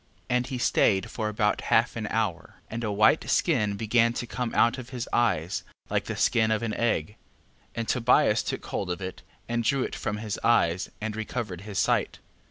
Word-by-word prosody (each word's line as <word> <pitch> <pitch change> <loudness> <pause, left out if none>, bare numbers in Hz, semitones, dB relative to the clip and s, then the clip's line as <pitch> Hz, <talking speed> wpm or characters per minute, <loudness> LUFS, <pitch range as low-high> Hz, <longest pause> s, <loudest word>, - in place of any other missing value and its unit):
11:14. - - +3
And 125 0 -2
he 130 - -4
stayed 100 -5 +2
about 105 -1 0
half 115 +2 +2
an 110 -2 -3
hour: 110 -6 -2 0.2
and 115 +1 -4
a 105 - -1
white 105 +1 +3
skin 105 -1 +2
began 115 +2 +2
to 120 - -3
come 120 0 -3
out 120 +3 +3
of 120 - -9
his 125 -2 -5
eyes, 95 -8 +1 0.3
like - - 0
the - - -4
skin 110 -1 +2
of 110 +1 0
an 110 -2 -2
egg. 105 -8 0
11:15. 105 - -19 0.6
And 115 -1 -3
Tobias 125 -1 +3
took - - -4
hold 95 - -3
of 90 - -2
it, 95 -1 -6 0.3
and 120 0 -1
drew 135 +3 +2
it - - -4
from 105 -2 -3
his 105 -1 -4
eyes, 95 -7 +2
and 110 -1 -3
recovered 110 -4 -4
his 105 -1 -7
sight. - - +1
110 Hz, 200 wpm, -27 LUFS, 105-120 Hz, 0.6 s, 11:14